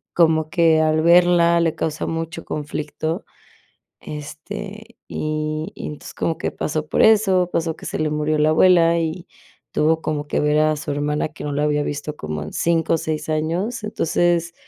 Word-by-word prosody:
como 160 Hz, -2 st, +3 dB
que 165 Hz, -2 st, +4 dB
al 155 Hz, 0 st, +2 dB
verla 170 Hz, 0 st, +5 dB
le 165 Hz, -2 st, +1 dB
causa 155 Hz, -1 st, -3 dB
mucho 165 Hz, 0 st, -4 dB
conflicto, 155 Hz, +4 st, -4 dB, 0.8 s
este, 200 Hz, +9 st, -8 dB
y 155 Hz, +1 st, -3 dB
y -, -, -7 dB
entonces 150 Hz, -, -8 dB
como 165 Hz, -, -2 dB
que -, -, -2 dB
pasó 155 Hz, 0 st, -3 dB
por -, -, +2 dB
eso, 195 Hz, -5 st, +4 dB
pasó 165 Hz, -1 st, -1 dB
que -, -, -13 dB
se -, -, -3 dB
le 155 Hz, -, 0 dB
murió 150 Hz, 0 st, 0 dB
la 150 Hz, +1 st, +3 dB
abuela, 170 Hz, 0 st, +5 dB
y 165 Hz, +2 st, -3 dB, 0.5 s
tuvo 160 Hz, +1 st, +2 dB
como 150 Hz, -1 st, -2 dB
que -, -, 0 dB
ver 150 Hz, 0 st, +2 dB
a 155 Hz, 0 st, +2 dB
su 150 Hz, -, -6 dB
hermana 150 Hz, +1 st, -1 dB
que 155 Hz, -, -10 dB
no 145 Hz, -, -3 dB
la 145 Hz, +1 st, 0 dB
había 150 Hz, 0 st, +1 dB
visto 145 Hz, +1 st, -4 dB
como 75 Hz, -, -5 dB
en 75 Hz, -, -8 dB
5 165 Hz, -1 st, +1 dB
o 165 Hz, -, +1 dB
6 155 Hz, 0 st, -3 dB
años, 170 Hz, +9 st, -2 dB
entonces 170 Hz, -3 st, 0 dB
160 Hz, 180 wpm, -21 LUFS, 150-170 Hz, 0.8 s, verla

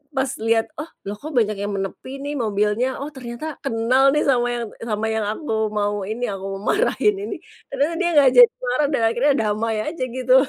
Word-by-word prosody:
pas 265 Hz, 0 st, +1 dB
lihat, 225 Hz, 0 st, +2 dB
"Oh 305 Hz, -, -5 dB, 0.2 s
loh 205 Hz, -, -3 dB
kok 310 Hz, -, -6 dB
banyak 215 Hz, -2 st, +2 dB
yang 205 Hz, 0 st, -3 dB
menepi 260 Hz, +8 st, -5 dB
nih 290 Hz, +1 st, -3 dB
mobilnya? 210 Hz, +2 st, +1 dB
Oh 285 Hz, -, -4 dB
ternyata 265 Hz, +4 st, -6 dB
kenal 255 Hz, +2 st, +3 dB
nih 300 Hz, -, +3 dB
sama 245 Hz, -3 st, +3 dB
yang 235 Hz, -1 st, -3 dB, 0.2 s
sama 215 Hz, -1 st, -1 dB
yang 220 Hz, -1 st, -1 dB
aku 220 Hz, -4 st, -1 dB
mau 205 Hz, 0 st, 0 dB
ini, 225 Hz, +3 st, -4 dB
yang 195 Hz, -, -3 dB
aku 195 Hz, -, -5 dB
mau 205 Hz, -, 0 dB
marahin 420 Hz, -1 st, +2 dB
ini." -, -, -4 dB, 0.4 s
Ternyata 295 Hz, +4 st, +1 dB
dia 350 Hz, -2 st, +2 dB
nggak 280 Hz, -3 st, +6 dB
jadi 245 Hz, -1 st, +9 dB
marah 270 Hz, +4 st, +2 dB
dan 255 Hz, -, +1 dB
akhirnya 265 Hz, +5 st, +2 dB
damai 220 Hz, +1 st, 0 dB
aja 310 Hz, -3 st, -3 dB
gitu. 255 Hz, +1 st, +1 dB
240 Hz, 205 wpm, -22 LUFS, 215-275 Hz, 0.4 s, jadi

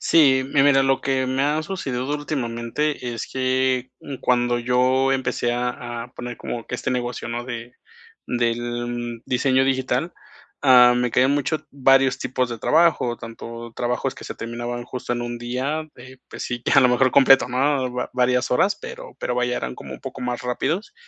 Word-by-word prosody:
Sí, 135 Hz, -5 st, +4 dB
mi 135 Hz, -, +5 dB
mira, 135 Hz, -1 st, +5 dB
lo 135 Hz, -1 st, +2 dB
que 130 Hz, -1 st, 0 dB
me 130 Hz, +1 st, 0 dB
ha 150 Hz, +2 st, +1 dB
sucedido 135 Hz, -9 st, -3 dB
últimamente 135 Hz, -2 st, -2 dB
es 115 Hz, -, -5 dB
que, 130 Hz, 0 st, 0 dB
mm, 140 Hz, -2 st, -8 dB
cuando 120 Hz, -1 st, +1 dB
yo 130 Hz, +2 st, +2 dB
empecé 130 Hz, -2 st, 0 dB
a 120 Hz, -1 st, -3 dB
a 125 Hz, -, -16 dB
poner 120 Hz, -1 st, -6 dB
como 115 Hz, -1 st, -5 dB
que 125 Hz, -, -3 dB
este 130 Hz, -, -2 dB
negocio, 125 Hz, -1 st, -3 dB
¿no? 120 Hz, +1 st, -4 dB
De 120 Hz, -1 st, -7 dB, 0.5 s
del 120 Hz, 0 st, -2 dB
diseño 130 Hz, +1 st, +2 dB
digital, 135 Hz, +5 st, 0 dB, 0.5 s
ah, 125 Hz, -2 st, +7 dB
me 125 Hz, 0 st, 0 dB
quedé 125 Hz, +3 st, +4 dB
mucho 145 Hz, +3 st, +1 dB, 0.2 s
varios 135 Hz, -1 st, +4 dB
tipos 125 Hz, -1 st, -1 dB
de 115 Hz, -1 st, -5 dB
trabajo, 155 Hz, -5 st, +3 dB
tanto 115 Hz, 0 st, -9 dB
trabajos 120 Hz, 0 st, -2 dB
que -, -, -12 dB
se -, -, -6 dB
terminaban 120 Hz, +1 st, -5 dB
justo 125 Hz, 0 st, -5 dB
en 120 Hz, -, -3 dB
1 120 Hz, 0 st, -4 dB
día, 130 Hz, +6 st, -3 dB
eh, 125 Hz, +1 st, -13 dB
pues -, -, -7 dB
sí, 120 Hz, -1 st, -4 dB
que -, -, -1 dB
a -, -, +7 dB
lo 130 Hz, -, +5 dB
mejor 125 Hz, +1 st, +3 dB
completo, 135 Hz, 0 st, +6 dB
¿no?, 130 Hz, 0 st, +1 dB
va 125 Hz, -, -3 dB
varias 125 Hz, 0 st, +1 dB
horas, 195 Hz, +11 st, +3 dB
pero 475 Hz, +1 st, -9 dB
pero, 125 Hz, -, -2 dB
vaya, 125 Hz, 0 st, 0 dB
eran 65 Hz, 0 st, -4 dB
como -, -, -9 dB
un -, -, -12 dB
poco -, -, -8 dB
más 125 Hz, -1 st, -3 dB
rápidos. 155 Hz, -, -2 dB
125 Hz, 185 wpm, -22 LUFS, 120-135 Hz, 0.5 s, ah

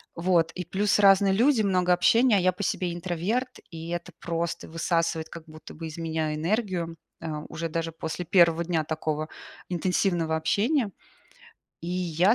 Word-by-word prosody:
Вот, 170 Hz, -1 st, +2 dB
и 180 Hz, -, -4 dB
плюс 195 Hz, +4 st, +1 dB
разные 195 Hz, -1 st, +6 dB
люди, 240 Hz, +4 st, +4 dB
много 180 Hz, -3 st, +3 dB
общения, 230 Hz, +6 st, +4 dB
а -, -, +4 dB
я 185 Hz, 0 st, +3 dB
по 185 Hz, +3 st, -6 dB
себе 180 Hz, -2 st, -1 dB
интроверт, 185 Hz, +9 st, -2 dB
и 165 Hz, 0 st, -8 dB
это 175 Hz, 0 st, -4 dB
просто 170 Hz, 0 st, -3 dB
высасывает 165 Hz, -1 st, -1 dB
как 165 Hz, 0 st, -9 dB
будто 155 Hz, -1 st, -12 dB
бы 165 Hz, +1 st, -7 dB
из 155 Hz, -, -8 dB
меня 160 Hz, -2 st, -2 dB
энергию, 170 Hz, 0 st, -1 dB, 0.2 s
э, -, -, -5 dB, 0.2 s
уже 165 Hz, +1 st, -4 dB
даже 165 Hz, +1 st, -2 dB
после 160 Hz, +2 st, -5 dB
1 170 Hz, -1 st, +4 dB
дня 165 Hz, -2 st, 0 dB
такого 155 Hz, 0 st, -2 dB, 0.4 s
интенсивного 175 Hz, -2 st, +1 dB
общения. 215 Hz, -, +1 dB, 0.9 s
И -, -, -6 dB
я 180 Hz, +2 st, +2 dB
175 Hz, 160 wpm, -26 LUFS, 165-190 Hz, 0.9 s, разные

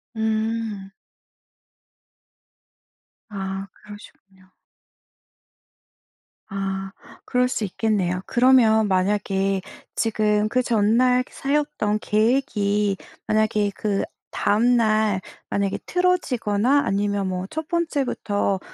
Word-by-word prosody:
음. 220 Hz, -2 st, -2 dB, 2.4 s
아 195 Hz, -1 st, -5 dB
그러시군요. 195 Hz, -2 st, -16 dB, 2.0 s
아 195 Hz, -1 st, -3 dB, 0.3 s
그럴 250 Hz, 0 st, +2 dB
수 250 Hz, -, -2 dB
있겠네요. 190 Hz, -3 st, -1 dB
그러면 240 Hz, -4 st, +4 dB
만약에 195 Hz, 0 st, 0 dB, 0.3 s
지금 215 Hz, -1 st, +1 dB
그 255 Hz, +2 st, +2 dB
전날 240 Hz, +3 st, +3 dB
세웠던 280 Hz, -7 st, -1 dB
계획이 210 Hz, -3 st, +1 dB, 0.3 s
만약에 215 Hz, -1 st, +1 dB
그다음 215 Hz, +3 st, 0 dB
날 215 Hz, -3 st, +2 dB, 0.3 s
만약에 200 Hz, -1 st, -1 dB
틀어지거나 280 Hz, -, +1 dB
아니면 200 Hz, 0 st, 0 dB
뭐 185 Hz, 0 st, -3 dB
첫 315 Hz, 0 st, -5 dB
번째부터 270 Hz, -, -1 dB
210 Hz, 180 characters per minute, -23 LUFS, 195-240 Hz, 2.4 s, 그러면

